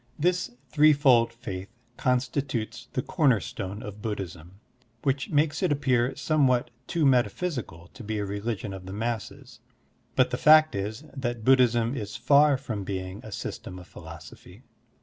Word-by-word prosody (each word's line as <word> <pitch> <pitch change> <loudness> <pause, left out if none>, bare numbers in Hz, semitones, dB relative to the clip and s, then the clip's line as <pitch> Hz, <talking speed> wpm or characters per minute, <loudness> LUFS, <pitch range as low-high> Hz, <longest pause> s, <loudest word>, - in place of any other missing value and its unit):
This 180 +3 +1 0.2
threefold 140 -6 +5
faith 100 -5 -7 0.3
constitutes 125 -3 -1
the 125 - -1
comer 140 - +3
stone 95 +6 -6
of 105 0 -8
Buddhism, 95 -4 -6 0.4
which 135 0 0
makes 150 +2 +1
it 185 - +2
appear 130 -3 +1
somewhat 135 -5 +2 0.2
too 165 -3 0
metaphysical 125 - 0
to 120 - -10
be 110 0 -3
a 105 - -2
religion 100 0 -4
of 95 -1 -9
the 95 - -6
masses, 110 0 -5 0.6
but - - +3
the - - -1
fact 155 +1 +7
is 105 +7 -4
that 120 -4 -3
Buddhism 125 -2 +4
is 105 -4 -5
far 140 +4 +4
from 110 -6 -5
being 95 0 -5
a 110 - -9
system 90 - -6
of 90 - -11
philosophy. 80 -2 -12
120 Hz, 150 wpm, -27 LUFS, 100-140 Hz, 0.6 s, fact